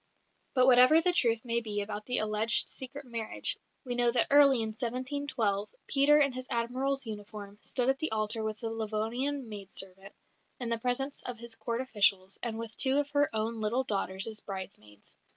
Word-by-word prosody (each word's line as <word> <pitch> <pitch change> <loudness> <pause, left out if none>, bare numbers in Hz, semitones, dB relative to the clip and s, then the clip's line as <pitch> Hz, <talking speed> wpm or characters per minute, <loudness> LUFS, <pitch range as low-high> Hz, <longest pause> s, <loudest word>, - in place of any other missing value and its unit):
But 255 -1 +5
whatever 255 +4 +7
the 355 +2 +3
truth 230 -6 +2
may 235 0 +1
be 210 -2 -4
about 210 +1 -5
the 250 - -1
alleged 215 +1 +2
secret 270 +2 -9
marriage, 230 -3 -2 0.3
we 250 - -1
know 245 0 +3
that 235 -1 +3
early 275 -4 +6
in 220 - -2
1712, 240 -3 -2 0.2
Peter, 290 +2 +4
in 280 -2 +3
his 255 0 -6
Admiral's 255 +3 0
uniform, 205 -1 -8
stood 250 -2 0
at 270 0 +2
the 315 - -2
altar 220 +1 -1
with 215 0 -4
the 225 -1 -3
Livonian 225 +5 -2
maid 205 -3 -9
servant, 195 +1 -1 0.4
in 245 -2 -3
the 230 -1 -1
presence 255 +4 -2
of 250 -1 -6
his 235 0 -3
Court 235 +1 -3
officials, 200 -6 +1
and 230 -2 -4
with 230 0 -7
two 265 +1 +2
of 290 0 -1
her 290 0 +2
own 220 0 -3
little 235 +5 0
daughters 195 -4 -1
as 220 -1 -4
bridesmaids. 185 - -10
230 Hz, 190 wpm, -30 LUFS, 215-260 Hz, 0.4 s, whatever